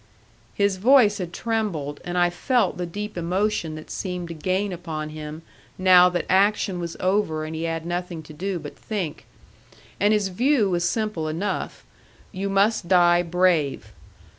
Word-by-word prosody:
His 200 -2 +1
voice 220 -1 +5
had 175 -2 -4
trembled, 180 -10 -3
and 175 0 -4
I 175 0 +3
felt 230 +2 +1
the 180 -1 -3
deep 205 +5 -6
emotion 180 -1 -1
that 155 - -10
seemed 180 -3 -4
to - - -5
gain 185 +4 -1
upon 160 -3 -5
him 155 +1 -8 0.3
now 185 -1 +7
that 175 -1 -2
action 195 -1 +2
was 170 -1 -5
over 185 -5 0
and 155 - -6
he 160 +1 -3
had 165 0 -3
nothing 175 -1 -4
to 155 - -12
do 185 +4 -3
but 150 -3 -8
think. 190 -9 -5 0.7
And 205 +1 +3
his 210 -2 +2
view 230 +1 +2
was 175 0 +1
simple 215 -8 -2
enough: 170 +7 -3 0.5
you 195 +2 -3
must 195 -1 +2
die 175 -1 +5
brave. 170 - +1
180 Hz, 165 wpm, -24 LUFS, 165-200 Hz, 0.7 s, now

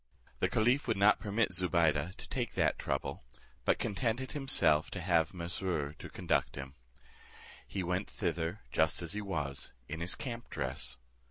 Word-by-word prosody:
The - - +2
caliph 125 +6 +3
would 115 - +1
not 100 +2 +6
permit 105 -1 +1
Zobeide 85 -2 +2
to - - -9
take - - -2
that - - +2
trouble, 70 0 -2 0.4
but - - +4
contented 120 +5 -1
himself 85 - +3
to 100 - -5
have 85 -3 +3
Mesrour 85 -4 -2
to - - -7
conduct - - 0
him. 65 -1 -6 0.9
He 95 - -2
went 90 +3 -1
thither 85 +1 -2
just 80 +2 +2
as 85 - -1
he 105 - -2
was, 75 -9 -3
in 80 +2 -4
his 85 +2 -1
camp 120 -2 -5
dress. 65 -2 -2
90 Hz, 160 wpm, -33 LUFS, 80-105 Hz, 0.9 s, not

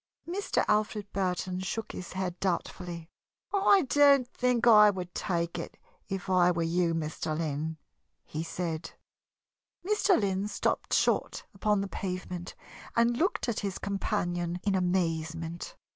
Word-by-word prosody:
Mr. 385 +4 0
Alfred 210 -1 0
Burton 185 -1 -1
shook 215 +3 -3
his 180 - -7
head 185 -2 -3
doubtfully. 175 -2 -3 0.5
"I 400 -1 +5
don't 280 -1 +5
think 245 -2 +1
I 210 -3 +8
would 180 -3 -4
take 170 -2 -2
it, 165 - -7 0.3
if 195 -1 -4
I 180 -1 +4
were 170 -1 +1
you, 165 0 +1
Mr. 155 -1 -3
Lynn," 160 0 -2 0.5
he 155 - -5
said. 165 0 -4 0.9
Mr. 420 -2 +3
Lynn 195 -1 0
stopped - - 0
short - - +1
upon 210 0 +1
the 200 - -2
pavement 180 -2 -5 0.4
and 235 +1 +3
looked 340 +2 0
at 235 - -1
his 195 -2 -3
companion 175 -3 -2
in 200 - +1
amazement. 170 -2 -1
185 Hz, 135 wpm, -29 LUFS, 170-210 Hz, 0.9 s, I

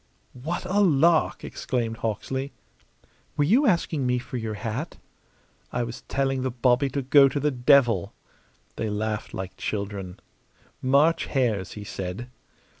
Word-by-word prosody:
"What 155 +9 -4
a 190 +3 +1
lark!" 165 -3 +3
exclaimed 115 -3 -3
Hawksley. 130 +5 -3 0.8
"Were 145 - +3
you 240 - +4
asking 165 - +1
me 125 0 +2
for 125 +1 -5
your 110 -2 -4
hat?" 115 +9 -4 0.7
"I 120 - -1
was 120 +2 -6
telling 135 -1 0
the 130 - -1
bobby 125 +2 +2
to 140 0 -3
go 135 +1 +6
to 145 - -2
the 150 +1 +1
devil!" 120 - +3 0.7
They 110 - -2
laughed 105 +1 -3
like 95 0 -6
children. 100 -3 -4 0.6
"March 140 +6 +3
hares!" 110 -9 0
he 105 - -7
said. 100 +5 -6
125 Hz, 140 wpm, -25 LUFS, 110-140 Hz, 0.8 s, go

